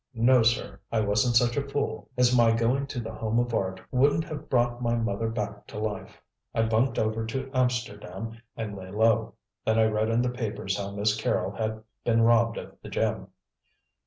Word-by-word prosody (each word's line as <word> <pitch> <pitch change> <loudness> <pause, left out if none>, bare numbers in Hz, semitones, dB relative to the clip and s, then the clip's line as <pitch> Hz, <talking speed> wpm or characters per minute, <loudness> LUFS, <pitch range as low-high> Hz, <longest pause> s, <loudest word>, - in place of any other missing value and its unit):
No, 120 +2 +5
sir; 110 -4 +1
I 115 - +2
wasn't 105 +3 +2
such 120 0 +4
a 140 -1 -1
fool, 140 0 -2
as 125 0 +4
my 115 -2 +5
going 125 +4 +1
to 135 -3 -4
The 110 -1 -5
Home 110 +1 -1
of 120 0 +1
Art 95 -3 -1
wouldn't 140 +5 +3
have 155 -2 -7
brought 120 -1 +1
my 120 -1 +1
mother 115 -1 -1
back 105 -2 -4
to - - -9
life. 105 -1 -4 0.4
I 115 - +3
bunked 115 +4 +1
over 110 +1 0
to 130 +3 -4
Amsterdam 115 -4 -2 0.2
and 110 -3 -4
lay 95 -1 -8
low. 110 +2 +2 0.3
Then 110 0 +2
I 110 - +5
read 110 0 +1
in 115 +2 +2
the 125 - 0
papers 105 -5 -3
how 100 -1 -3
Miss 105 +1 +1
Carrol 95 -3 0
had 110 +1 -3 0.2
been 115 -1 +3
robbed 115 0 +4
of - - -8
the - - -9
gem." - - -1
115 Hz, 195 wpm, -27 LUFS, 105-120 Hz, 0.4 s, No